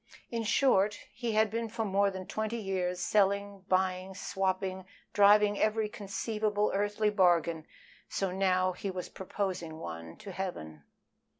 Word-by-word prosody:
In 230 Hz, -1 st, -1 dB
short, 210 Hz, -3 st, +3 dB, 0.2 s
he 235 Hz, -2 st, -3 dB
had 215 Hz, -1 st, +3 dB
been 230 Hz, 0 st, -2 dB
for 225 Hz, 0 st, -2 dB
more 200 Hz, 0 st, +2 dB
than 190 Hz, -1 st, -6 dB
twenty 220 Hz, +3 st, -3 dB
years 185 Hz, -4 st, -2 dB
selling, 200 Hz, -1 st, +1 dB
buying, 185 Hz, 0 st, 0 dB
swapping, 190 Hz, 0 st, -2 dB, 0.3 s
driving 205 Hz, 0 st, +5 dB
every 215 Hz, 0 st, +2 dB
conceivable 210 Hz, +1 st, -1 dB
earthly 205 Hz, +1 st, +1 dB
bargain 170 Hz, -5 st, +2 dB, 0.4 s
so 195 Hz, -2 st, -1 dB
now 185 Hz, -1 st, +2 dB
he 195 Hz, +2 st, -5 dB
was 185 Hz, -1 st, -5 dB
proposing 185 Hz, -4 st, -4 dB
one 80 Hz, -, -7 dB
to 200 Hz, -, -9 dB
Heaven. 80 Hz, -, -6 dB
195 Hz, 135 wpm, -31 LUFS, 185-210 Hz, 0.4 s, driving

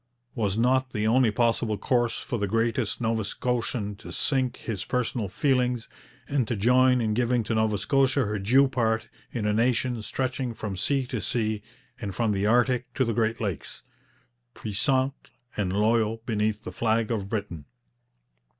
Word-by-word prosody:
Was 105 Hz, -4 st, -1 dB
not 130 Hz, +2 st, +2 dB
the 105 Hz, 0 st, -1 dB
only 120 Hz, +2 st, +4 dB
possible 115 Hz, 0 st, +1 dB
course 120 Hz, +2 st, +1 dB
for 120 Hz, -4 st, -4 dB
the 100 Hz, -, 0 dB
greatest 115 Hz, +1 st, 0 dB
Nova 110 Hz, -1 st, 0 dB
Scotian 115 Hz, -1 st, -2 dB
to -, -, -10 dB
sink 130 Hz, -4 st, +1 dB
his 105 Hz, -5 st, -4 dB
personal 120 Hz, -3 st, -1 dB
feelings, 125 Hz, +1 st, +1 dB, 0.4 s
and 140 Hz, -5 st, 0 dB
to 120 Hz, -, -1 dB
join 125 Hz, +4 st, +4 dB
in 110 Hz, -2 st, 0 dB
giving 120 Hz, +1 st, +1 dB
to 110 Hz, -, -2 dB
Nova 110 Hz, -1 st, +2 dB
Scotia 135 Hz, +2 st, +2 dB
her 105 Hz, 0 st, -2 dB
due 130 Hz, +8 st, +4 dB
part 115 Hz, -4 st, 0 dB, 0.2 s
in 115 Hz, -4 st, -3 dB
a 105 Hz, -, +2 dB
nation 120 Hz, +1 st, +1 dB
stretching 130 Hz, +1 st, -3 dB
from 105 Hz, -3 st, -4 dB
sea 135 Hz, +8 st, 0 dB
to 125 Hz, -3 st, -4 dB
sea 110 Hz, +1 st, -1 dB, 0.4 s
and 100 Hz, -5 st, -5 dB
from 115 Hz, +1 st, +1 dB
the 100 Hz, 0 st, 0 dB
Arctic 125 Hz, +2 st, +2 dB
to 130 Hz, -, +2 dB
the 115 Hz, -, 0 dB
Great 115 Hz, 0 st, 0 dB
Lakes, 100 Hz, -9 st, -4 dB, 0.7 s
puissant 130 Hz, +6 st, -1 dB, 0.3 s
and 100 Hz, -3 st, -1 dB
loyal 110 Hz, +2 st, +1 dB
beneath 110 Hz, -1 st, -1 dB
the -, -, -6 dB
flag 115 Hz, 0 st, 0 dB
of 100 Hz, -4 st, -2 dB
Britain? 100 Hz, -9 st, -4 dB
115 Hz, 165 wpm, -26 LUFS, 105-125 Hz, 0.7 s, only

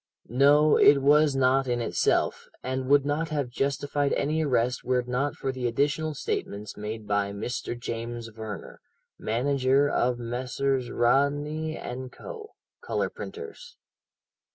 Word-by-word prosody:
No, 145 Hz, +5 st, +5 dB
it 145 Hz, -, +7 dB
was 145 Hz, 0 st, +5 dB
not 135 Hz, 0 st, +3 dB
in 120 Hz, -1 st, 0 dB
itself, 115 Hz, -, 0 dB, 0.2 s
and 130 Hz, 0 st, -2 dB
would 145 Hz, -1 st, +5 dB
not 150 Hz, +2 st, -1 dB
have 145 Hz, -5 st, -2 dB
justified 140 Hz, +2 st, 0 dB
any 155 Hz, +3 st, 0 dB
arrest 125 Hz, -3 st, +1 dB
were 125 Hz, +1 st, +1 dB
it 120 Hz, -, -14 dB
not 130 Hz, +4 st, -1 dB
for 135 Hz, -, -2 dB
the 130 Hz, -2 st, -2 dB
additional 145 Hz, +5 st, 0 dB
statements 105 Hz, -5 st, -4 dB
made 105 Hz, +1 st, -6 dB
by 100 Hz, -1 st, 0 dB
Mr. 120 Hz, +3 st, -4 dB
James 115 Hz, 0 st, -5 dB
Verner, 110 Hz, -2 st, -8 dB, 0.4 s
manager 135 Hz, +4 st, +2 dB
of 125 Hz, -3 st, +1 dB
Messrs. 125 Hz, +2 st, -2 dB
Rodney 145 Hz, +5 st, +1 dB, 0.2 s
& 130 Hz, 0 st, -6 dB
Co., 450 Hz, -3 st, -9 dB, 0.3 s
colour -, -, -1 dB
printers. 445 Hz, 0 st, -9 dB
130 Hz, 135 wpm, -27 LUFS, 120-145 Hz, 0.4 s, it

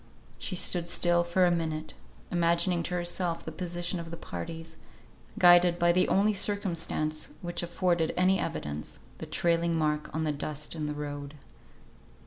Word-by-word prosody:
She 185 Hz, -, -3 dB
stood 175 Hz, -1 st, 0 dB
still 175 Hz, 0 st, +3 dB
for 175 Hz, +2 st, +2 dB
a 175 Hz, -, +3 dB
minute, 160 Hz, -2 st, -2 dB, 0.4 s
imagining 170 Hz, +1 st, +2 dB
to 180 Hz, +2 st, -3 dB
herself 175 Hz, -1 st, -1 dB
the 160 Hz, -, -5 dB
position 175 Hz, +1 st, -3 dB
of 165 Hz, -1 st, -7 dB
the 170 Hz, -, -7 dB
parties, 160 Hz, -, -7 dB, 0.6 s
guided 175 Hz, -1 st, +6 dB
by 175 Hz, 0 st, +4 dB
the 180 Hz, +1 st, +3 dB
only 205 Hz, +2 st, +3 dB
circumstance 170 Hz, -6 st, -1 dB
which 175 Hz, 0 st, -2 dB
afforded 175 Hz, -1 st, 0 dB
any 185 Hz, +1 st, +4 dB
evidence, 75 Hz, 0 st, -4 dB, 0.2 s
the -, -, -6 dB
trailing 170 Hz, -1 st, +1 dB
mark 150 Hz, -1 st, 0 dB
on 160 Hz, -, -2 dB
the 155 Hz, -, +1 dB
dust 150 Hz, 0 st, -4 dB
in 155 Hz, -2 st, -3 dB
the 150 Hz, -, -3 dB
road. 145 Hz, 0 st, -6 dB
170 Hz, 155 wpm, -29 LUFS, 155-175 Hz, 0.6 s, guided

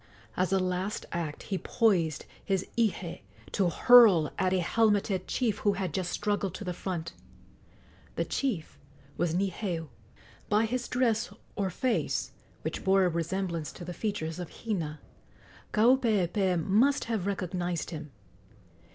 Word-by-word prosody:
As 185 Hz, 0 st, 0 dB
a 195 Hz, -, +4 dB
last 185 Hz, +2 st, -2 dB
act 165 Hz, -4 st, -4 dB
he 190 Hz, -2 st, -3 dB
poised 175 Hz, -10 st, +1 dB, 0.2 s
his 195 Hz, -2 st, 0 dB
ihe 195 Hz, -7 st, 0 dB, 0.3 s
to 190 Hz, -4 st, +2 dB
hurl 200 Hz, -5 st, +7 dB
at 185 Hz, -, +2 dB
a 190 Hz, -, +3 dB
helmeted 200 Hz, -1 st, +1 dB
chief 225 Hz, -5 st, 0 dB
who 205 Hz, -1 st, +2 dB
had 190 Hz, -5 st, -3 dB
just 185 Hz, -2 st, -1 dB
struggled 205 Hz, -3 st, -1 dB
to -, -, -6 dB
the 180 Hz, -2 st, -3 dB
front. 175 Hz, -2 st, -4 dB, 1.0 s
The -, -, 0 dB
chief 220 Hz, -, -2 dB, 0.4 s
was 170 Hz, -1 st, 0 dB
Niheu. 180 Hz, -3 st, -2 dB, 0.6 s
By 215 Hz, +2 st, +3 dB
his 245 Hz, +2 st, -2 dB
dress 235 Hz, -4 st, +1 dB, 0.2 s
or 195 Hz, -2 st, 0 dB
face, 240 Hz, +6 st, -1 dB, 0.3 s
which -, -, -4 dB
bore 190 Hz, 0 st, +4 dB
a -, -, +3 dB
resemblance 170 Hz, -1 st, -2 dB
to 175 Hz, -, -9 dB
the 180 Hz, -, -5 dB
features 165 Hz, -6 st, -3 dB
of 175 Hz, -2 st, -5 dB
Hina, 165 Hz, -9 st, -4 dB, 0.7 s
Kaupeepee 210 Hz, -6 st, +3 dB
must 245 Hz, -, +3 dB
have 220 Hz, -5 st, -2 dB
recognized 180 Hz, -3 st, -2 dB
him. 155 Hz, -2 st, -6 dB
190 Hz, 140 wpm, -29 LUFS, 175-215 Hz, 1.0 s, hurl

